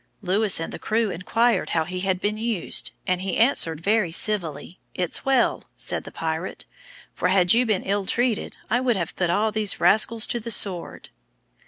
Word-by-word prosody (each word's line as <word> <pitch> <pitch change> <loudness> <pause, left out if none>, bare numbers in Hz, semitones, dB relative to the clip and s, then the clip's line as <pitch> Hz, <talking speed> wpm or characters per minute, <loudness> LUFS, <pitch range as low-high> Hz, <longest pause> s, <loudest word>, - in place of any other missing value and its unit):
Lewis 195 +1 +3
and 165 - -5
the - - -7
crew 220 -1 0
inquired 230 +8 +1
how 160 - +3
he 180 +3 -5
had 190 -1 0
been 205 +2 -1
used, 220 -4 -2 0.2
and 185 -1 0
he 190 -2 -2
answered, 170 - +3
very 205 -2 +1
civilly. 175 -3 -2 0.2
"It's 180 -2 -1
well," 265 -3 +2
said - - -3
the - - -9
pirate, 160 +2 -4 0.5
"for - - -1
had 180 -1 +4
you 245 +1 +3
been 210 -4 0
ill 200 0 -1
treated, 240 -2 -1
I 245 +3 +1
would 250 -3 +1
have 170 -4 -3
put 180 -2 0
all 210 +5 +1
these 210 -1 0
rascals 215 +5 +3
to 240 - -2
the 230 +1 -7
sword." 190 -5 -1
200 Hz, 185 wpm, -24 LUFS, 180-225 Hz, 0.5 s, had